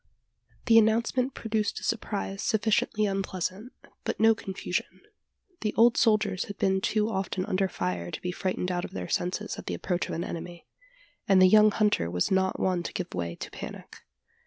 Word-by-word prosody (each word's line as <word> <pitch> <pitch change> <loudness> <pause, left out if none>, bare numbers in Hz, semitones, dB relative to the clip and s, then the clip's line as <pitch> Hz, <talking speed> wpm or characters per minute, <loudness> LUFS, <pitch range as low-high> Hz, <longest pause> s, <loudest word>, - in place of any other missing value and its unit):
The 225 -1 +7
announcement 230 +4 +1
produced 215 -2 -1
a - - -13
surprise 200 -3 -2
sufficiently 215 0 +1
unpleasant, 195 +3 -3 0.3
but - - -3
no 225 0 +6
confusion. 195 -3 -4 0.6
The 215 -1 -2
old 230 +1 +5
soldiers 210 -4 +2
had 205 - -8
been 190 0 +1
too 215 +1 +1
often 190 -1 -2
under 195 -2 +1
fire 90 - -3
to - - -5
be 180 - -1
frightened 185 0 -2
out 175 -1 -1
of - - -7
their 90 -1 -4
senses 190 +4 -2
at - - -9
the - - -2
approach 180 -2 -2
of - - -3
an 170 - -2
enemy; 170 0 -7 0.6
and 195 -1 +5
the 185 - +8
young 215 +2 +7
hunter 210 - +1
was 90 - 0
not 190 0 +1
one 185 -2 +1
to - - -6
give 185 - -4
way 85 -1 -3
to - - -7
a - - -35
panic. - - -9
195 Hz, 185 wpm, -28 LUFS, 180-215 Hz, 0.6 s, the